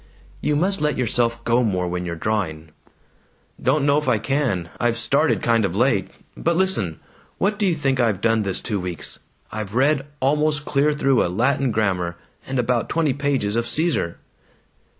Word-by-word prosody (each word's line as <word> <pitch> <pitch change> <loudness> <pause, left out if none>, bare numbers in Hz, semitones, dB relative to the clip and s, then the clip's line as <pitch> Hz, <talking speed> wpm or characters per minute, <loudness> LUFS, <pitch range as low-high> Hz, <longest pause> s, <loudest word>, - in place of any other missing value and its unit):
"You 150 - +1
must 185 +3 +1
let 150 0 +1
yourself 120 -1 0
go 115 +1 +3
more 90 -6 0
when 90 0 -3
you're 85 - -3
drawing." 80 -5 -2 0.9
"Don't 140 +3 +2
know 145 +1 +4
if 150 - -7
I 125 -3 +3
can. 110 - -1
I've 120 -1 +1
started 140 +7 +1
kind 115 -1 +3
of 95 -2 -1
late. 100 -5 +2 0.3
But 170 +1 0
listen! 165 - +1 0.4
What 205 +2 0
do 205 - +2
you 175 - +2
think 135 -3 0
I've 110 -6 +2
done 115 +1 +2
this 100 -2 -1
two 105 -4 -2
weeks? 90 -3 -4 0.3
I've 110 -1 -5
read 140 +2 +2
almost 150 +2 +1
clear 150 +1 +2
through 135 -4 +3
a - - -1
Latin 130 +7 +1
grammar, 95 -6 0 0.3
and 135 - -2
about 125 -1 0
twenty 155 -4 +1
pages 135 -7 0
of 115 0 0
Caesar." 155 - 0
120 Hz, 175 wpm, -22 LUFS, 100-145 Hz, 0.9 s, know